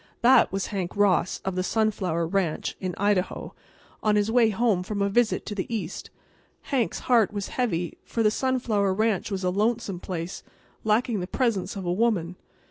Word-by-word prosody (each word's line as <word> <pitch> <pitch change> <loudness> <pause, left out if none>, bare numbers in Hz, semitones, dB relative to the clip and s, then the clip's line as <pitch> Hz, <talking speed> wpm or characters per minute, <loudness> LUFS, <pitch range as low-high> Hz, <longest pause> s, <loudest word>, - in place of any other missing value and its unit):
That 245 +2 +6
was 195 0 -1
Hank 185 -1 -3
Ross, 190 -3 +2
of 190 - -1
the 185 - -1
Sunflower 190 -5 0
Ranch, 175 -2 -1
in 185 -2 -3
Idaho, 200 -2 0 0.5
on 215 -1 +2
his 210 +1 +2
way 235 -2 +5
home 215 -3 +1
from 200 +3 -4
a 200 0 +2
visit 235 +2 +1
to - - -4
the 200 +2 -4
East. 195 -6 -4 0.6
Hank's 255 -5 0
heart 235 -5 +3
was 205 -2 -4
heavy, 180 -9 -2
for 230 - -1
the 215 - +4
Sunflower 220 -6 0
Ranch 215 -1 +1
was 195 -2 -3
a 180 - +1
lonesome 210 -1 0
place, 175 -1 -5 0.4
lacking 220 0 +1
the 180 - -4
presence 215 -6 -1
of 195 -2 -5
a 175 - 0
woman. 185 -5 +1
200 Hz, 180 wpm, -26 LUFS, 185-225 Hz, 0.6 s, That